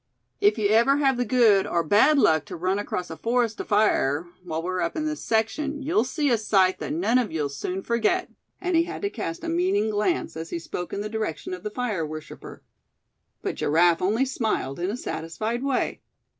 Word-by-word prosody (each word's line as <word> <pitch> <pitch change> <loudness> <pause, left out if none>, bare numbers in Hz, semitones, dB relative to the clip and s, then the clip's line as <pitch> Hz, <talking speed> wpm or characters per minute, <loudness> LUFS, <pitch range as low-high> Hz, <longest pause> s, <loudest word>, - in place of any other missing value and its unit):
"If 205 +2 +3
you 210 -2 +2
ever 235 +6 +4
have 270 -3 +2
the 245 - 0
good 215 -4 +4
or 170 -1 0
bad 210 - +4
luck 160 - +4
to - - -7
run 185 +4 0
across 180 -4 -4
a - - -5
forest 235 -1 0
afire, 175 -8 +2 0.2
while 165 -2 -4
we're 185 +1 -2
up 170 - -1
in 310 - -2
this 305 0 -3
section, 280 +6 -1
you'll 275 -5 +2
see 290 +1 0
a 230 - +3
sight 190 -3 +2
that - - -4
none 295 -6 +2
of 235 -4 -2
you'll 150 -3 -1
soon 180 +7 -4
forget," 235 +11 0 0.3
and 360 -1 -1
he 330 0 +4
had 365 +3 -7
to 400 - 0
cast 165 - -5
a - - -4
meaning 330 - +1
glance 210 - -1
as 160 +1 -6
he - - -3
spoke 175 +1 -6
in 200 - -3
the 210 - -3
direction 215 -6 -4
of 180 - -6
the 210 - -4
fire 215 -6 -2
worshipper. 155 0 -8 0.8
But - - -1
Giraffe 165 +2 +3
only 220 +8 +2
smiled 220 - -2
in 180 +2 -1
a 220 - -3
satisfied 215 +6 -3
way. 275 -1 -1
215 Hz, 210 wpm, -25 LUFS, 175-260 Hz, 0.8 s, ever